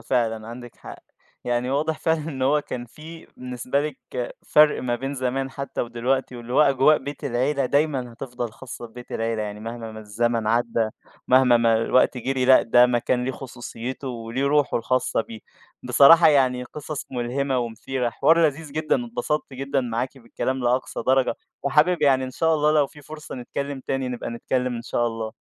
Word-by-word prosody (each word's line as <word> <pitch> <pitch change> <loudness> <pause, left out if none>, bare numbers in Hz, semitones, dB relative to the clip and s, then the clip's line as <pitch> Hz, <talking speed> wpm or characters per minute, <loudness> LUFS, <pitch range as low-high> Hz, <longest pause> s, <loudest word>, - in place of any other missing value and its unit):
فعلًا 115 -3 -1
عندِك 120 0 -10
حق. - - -10 0.5
يعني 120 +1 -1
واضح 155 +3 0
فعلًا 160 0 +1
إن 135 -4 -5
هو 145 +3 +3
كان 120 -4 -6
في 160 +6 -12
بالنسبة 125 +2 -2
لِك 125 -3 -6 0.2
فرْق 150 0 +5
ما 120 -1 -1
بين 135 +3 -4
زمان 135 +1 -2
حتى 140 +1 -5
ودلوقتي 125 +2 -1
واللي 120 +1 -8
هو - - +4
أجواء 140 +1 +5
بيت 145 +1 -8
العيلة 135 +2 0
دايمًا 135 -3 0
هتفضَل 120 -2 -6
خاصّة 120 -1 -9
ببيت 120 +2 -12
العيلة، 115 -1 -1
يعني 105 0 -6
مهما 115 0 -6
ما 110 - -8
الزمن 115 +2 -1
عدّى 115 0 +1 0.4
مهما 130 -1 +6
ما 115 -1 +3
الوقت 125 +3 +2
جرِي، 130 +1 -1
لأ 130 +1 +7
ده 120 +2 +5
مكان 125 0 0
ليه 130 - -2
خصوصيّته 125 +1 -7
وليه 120 +2 -3
رُوحه 145 -2 +2
الخاصة 125 +2 0
بيه. 110 0 -8 0.4
بصراحة 165 +4 +7
يعني 130 -4 +3
قِصص 150 +2 -7
ملهِمة 130 +2 -1
ومثيرة، 120 +2 -3
حوار 165 +7 +4
لذيذ 150 0 -4
جدًا، 155 - 0
اتبسطت 150 - -3
جدًا 135 +1 -1
معاكِ 125 +2 -3
بالكلام 130 +2 -3
لأقصى 125 +2 0
درجة 130 0 +3 0.3
وحابب 155 +4 +3
يعني 130 -2 +4
إن 130 - -6
شاء 160 +5 +1
الله 150 0 +2
لو 150 -2 +3
في 150 - -16
فرصة 155 +2 -9
نتكلّم 140 +2 -5
تاني 135 -1 -1
نبقى 125 -1 -5
نتكلّم 125 +1 -2
إن 115 - -6
شاء 120 0 -1
الله. 115 -1 -4
130 Hz, 175 wpm, -24 LUFS, 120-140 Hz, 0.5 s, لأ